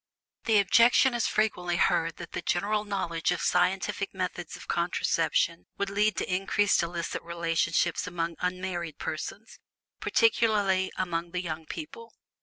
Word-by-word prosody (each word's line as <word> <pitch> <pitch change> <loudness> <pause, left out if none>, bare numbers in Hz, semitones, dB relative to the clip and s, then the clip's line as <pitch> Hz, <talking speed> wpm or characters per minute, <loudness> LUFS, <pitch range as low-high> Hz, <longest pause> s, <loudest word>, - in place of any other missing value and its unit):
The 225 -2 +4
objection 235 +6 +5
is 235 -2 +1
frequently 180 -5 0
heard 165 -1 +2
that 170 -2 -9
the - - -4
general 210 +4 0
knowledge 175 -5 -2
of 175 - -1
scientific 190 +2 0
methods 180 -2 -4
of - - -12
contraception 170 -1 0
would 200 -1 -2
lead 210 +2 +2
to 180 - -2
increased 195 +1 +2
illicit 170 0 -3
relations 170 0 +1 0.2
among 170 -1 -3
unmarried 180 -3 -3
persons, 205 +7 -6 0.4
particularly 205 - +2
among 170 -1 -2
the 180 0 -2
young 160 -2 -5
people. 455 +9 -8
180 Hz, 135 wpm, -28 LUFS, 170-205 Hz, 0.4 s, objection